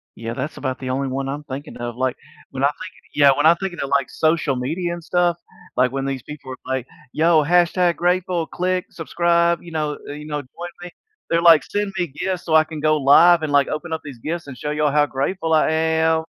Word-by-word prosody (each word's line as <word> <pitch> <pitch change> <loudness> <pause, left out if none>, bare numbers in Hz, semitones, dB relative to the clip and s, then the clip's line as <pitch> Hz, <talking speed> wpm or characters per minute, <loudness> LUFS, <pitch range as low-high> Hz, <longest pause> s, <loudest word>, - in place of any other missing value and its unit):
Yeah, 115 +1 -5
that's 130 +5 -5
about 130 -2 -3
the 130 -1 -5
only 135 +1 -1
one 135 +1 -3
I'm 145 +2 -5
thinking 140 +2 -7
of, 120 -1 -5
like, 130 0 -1 0.3
when 135 0 -4
I - - +6
think 185 +6 -6 0.2
yeah, 140 -2 +6
when 145 - +1
I 165 - +8
think 190 0 -4
of - - -10
it 140 - -2
like, 140 -1 +1
social 155 -4 +1
media 170 +8 -2
and 175 -1 -8
stuff, 175 0 +1 0.4
like, 125 0 +3
when 135 0 -3
these 135 -3 -3
people 145 -3 -9
are 130 - -5
like, 130 -1 -2 0.3
"Yo, 160 0 +4
hashtag 175 +2 +3
grateful. 180 -1 0
Click, 185 0 -1
subscribe!" 170 0 +1
You 170 - -11
know, 150 -2 -2
eh, - - -5
you 150 0 -9
know, 150 -1 -3
"Join 170 +6 -9
me," 180 - -7 0.4
they're 165 0 +2
like, 165 -3 +7
"Send 205 -1 -3
me 175 -1 0
gifts 180 +5 -4
so 160 - +1
I 155 - +7
can 155 -1 -7
go 155 0 +3
live 165 +5 +6
and, 150 - -2
like, 140 -1 +4
open 160 +2 -4
up 160 - -3
these 135 -5 -10
gifts 165 +4 -4
and 130 -3 -9
show 150 +5 -4
y'all 150 -1 +1
how 150 0 +3
grateful 160 +5 -2
I 155 - +4
am!" 160 0 +2
155 Hz, 240 wpm, -21 LUFS, 140-170 Hz, 0.4 s, I